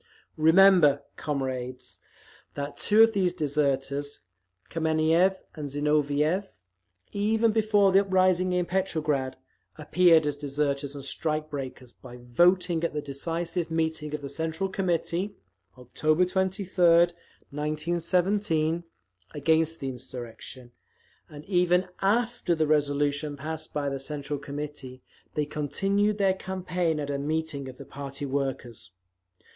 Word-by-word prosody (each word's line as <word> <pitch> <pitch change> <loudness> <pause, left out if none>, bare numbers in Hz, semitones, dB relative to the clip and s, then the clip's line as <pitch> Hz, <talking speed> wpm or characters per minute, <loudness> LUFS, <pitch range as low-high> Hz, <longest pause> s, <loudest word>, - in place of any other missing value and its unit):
Remember, 165 -1 +5
comrades, 130 -3 -4 0.6
that 140 0 -4
two 215 +2 +5
of 225 0 +4
these 185 -3 +1
deserters, 145 -2 -1 0.5
Kameniev 160 +3 +2 0.2
and 150 -2 -6
Zinoviev, 150 +5 +1 0.6
even 220 +2 +2
before 210 -2 +3
the 190 - +6
uprising 185 -1 +2
in 180 -1 +1
Petrograd, 155 -8 -1 0.4
appeared 165 0 +4
as 145 -1 -2
deserters 140 0 -2
and 140 -1 -6
strike 155 +2 -2
breakers, 130 -3 -7
by 125 -1 -12
voting 170 +7 +2
at 170 - -1
the 150 - -1
decisive 165 +4 -2
meeting 160 -2 -2
of 145 - -8
the 140 - -5
Central 160 +5 -3
Committee, 185 +1 -1 0.4
October 155 +7 +1
23d, 180 -2 +3 0.4
1917, 165 +3 0 0.5
against 160 +2 +1
the 135 - -3
insurrection; 125 -1 -9 0.6
and 150 0 -11
even 180 -1 +2
AFTER 220 -2 +1
the 160 -1 +1
resolution 145 0 0
passed 155 +2 -6
by 145 -1 -2
the 135 -1 -2
Central 145 +1 -4
Committee, 140 -2 -7 0.3
they 150 - 0
continued 195 +8 0
their 195 -2 +3
campaign 180 -4 -2
at 145 -1 -3
a 140 - -2
meeting 150 -2 -3
of 130 - -11
the - - -10
party 140 0 -7
workers…. 135 -5 -4
155 Hz, 120 wpm, -27 LUFS, 140-180 Hz, 0.6 s, the